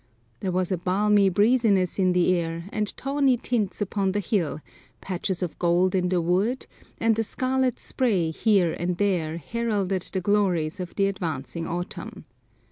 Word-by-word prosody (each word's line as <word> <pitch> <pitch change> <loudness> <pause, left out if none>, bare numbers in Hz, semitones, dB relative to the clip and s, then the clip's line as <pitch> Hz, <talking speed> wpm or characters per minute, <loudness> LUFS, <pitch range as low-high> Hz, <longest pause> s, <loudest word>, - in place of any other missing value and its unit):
There 190 - -2
was 180 0 -1
a 185 - 0
balmy 200 +2 +3
breeziness 205 -2 +2
in 185 -1 +3
the 180 0 +3
air, 165 -1 -3
and 210 -1 0
tawny 275 -2 +2
tints 220 -4 -2
upon 195 -1 0
the 205 - 0
hill, 175 - -1 0.4
patches 185 0 -3
of 175 - -5
gold 175 +1 +2
in 180 -1 +1
the 180 -1 +2
woods, 190 +9 0 0.3
and 225 -1 +2
a - - +2
scarlet 255 +2 0
spray 195 -11 0
here 190 -2 +2
and 175 0 -2
there 175 -5 0
heralded 200 0 -1
the 190 - -3
glories 185 -4 +1
of 180 -1 -6
the 200 - +2
advancing 165 -4 -3
autumn. 175 +2 -6
190 Hz, 160 wpm, -25 LUFS, 175-210 Hz, 0.4 s, balmy